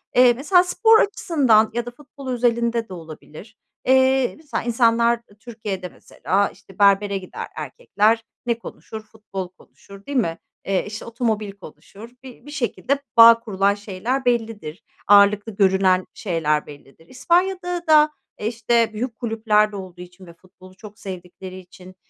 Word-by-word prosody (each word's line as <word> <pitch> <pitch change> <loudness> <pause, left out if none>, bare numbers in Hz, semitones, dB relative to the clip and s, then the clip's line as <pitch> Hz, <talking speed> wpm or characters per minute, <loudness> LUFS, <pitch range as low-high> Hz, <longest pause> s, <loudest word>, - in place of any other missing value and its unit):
Eee, 250 -1 +6
mesela 355 +9 +3
spor 445 +4 +4
açısından 270 - +2
ya 240 0 -2
da 245 - -7
futbol 275 +1 -14
özelinde 235 -2 0
de - - -8
olabilir, 165 +5 -12 0.3
eee, 260 0 +3
mesela 310 -2 -5
insanlar, 235 0 +2
eee, 205 - -21
Türkiye'de 210 -5 -6
mesela 200 +3 -2
işte 195 0 -19
berbere 200 0 +3
gider 185 -1 -8
erkekler, 225 - 0 0.2
ne 235 -1 -1
konuşur? 220 -1 -9
Futbol 210 -4 -8
konuşur 195 +2 -18
değil 285 -1 -3
mi? 170 -9 0 0.3
Eee, 195 -1 0
işte 210 +1 -8
otomobil 225 -3 -2
konuşur, 195 +3 -14
bi 255 -1 -13
bir 290 - -10
şekilde 280 0 -2 0.2
bağ 230 0 +9
kurulan 200 -3 0
şeyler 210 +6 -4
bellidir. 225 -7 -2 0.2
Ağırlıklı 205 +1 +4
görünen 190 -2 +3
şeyler 160 -6 -1
bellidir. 145 +2 -16
İspanya'da 355 - -1
da, 305 -1 +5 0.3
eee, 210 - -3
işte 230 0 +1
büyük 230 +2 -4
kulüplerde 220 -3 +1
olduğu 185 -2 -9
için 180 +1 -13
ve 170 - -14
futbolu 185 +1 -19
çok 210 +1 -14
sevdikleri 185 0 -9
için, 185 0 -15
220 Hz, 145 wpm, -21 LUFS, 190-245 Hz, 0.3 s, bağ